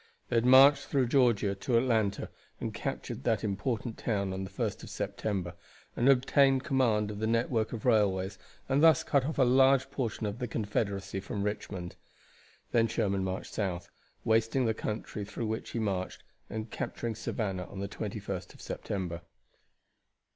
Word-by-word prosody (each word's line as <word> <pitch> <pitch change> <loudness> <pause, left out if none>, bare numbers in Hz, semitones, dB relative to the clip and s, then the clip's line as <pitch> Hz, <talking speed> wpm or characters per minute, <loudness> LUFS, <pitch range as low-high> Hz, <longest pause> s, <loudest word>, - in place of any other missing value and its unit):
They - - -1
had 115 +2 +2
marched 135 +2 +7
through 130 -4 +1
Georgia 120 -7 +3
to 115 +5 0
Atlanta 110 -5 +1 0.3
and - - -4
captured 65 - -4
that 110 -3 +1
important 110 +3 -2
town 100 -4 -1
on 95 0 -3
the 95 - -6
1st - - -3
of - - -9
September, 95 -5 -3 0.4
and 125 +3 +3
obtained 135 0 +4
command 115 -7 +1
of 105 - -6
the 110 - 0
network 115 -1 +1
of 115 -3 -6
railways, 95 -4 +2 0.3
and 135 +2 +2
thus 160 0 +6
cut 140 -3 +2
off 155 - -3
a 135 - +5
large 130 +1 +4
portion 115 -4 -2
of 105 +3 -4
the 125 - -2
Confederacy 100 -3 -2
from 100 +1 -4
Richmond. 105 -4 -4 0.7
Then 115 -1 +3
Sherman 100 -3 0
marched 95 0 -4
south, 90 -4 -3 0.3
wasting 115 +3 +2
the 110 - +2
country 105 -1 -4
through 115 +3 -5
which 110 +1 -3
he - - -5
marched, 95 -5 -2 0.3
and 110 0 -5
capturing 115 -1 -3
Savannah 100 -4 -3
on 100 - -8
the 100 - -2
21st - - -5
of - - -14
September. 90 -4 -4
110 Hz, 165 wpm, -30 LUFS, 100-125 Hz, 0.7 s, marched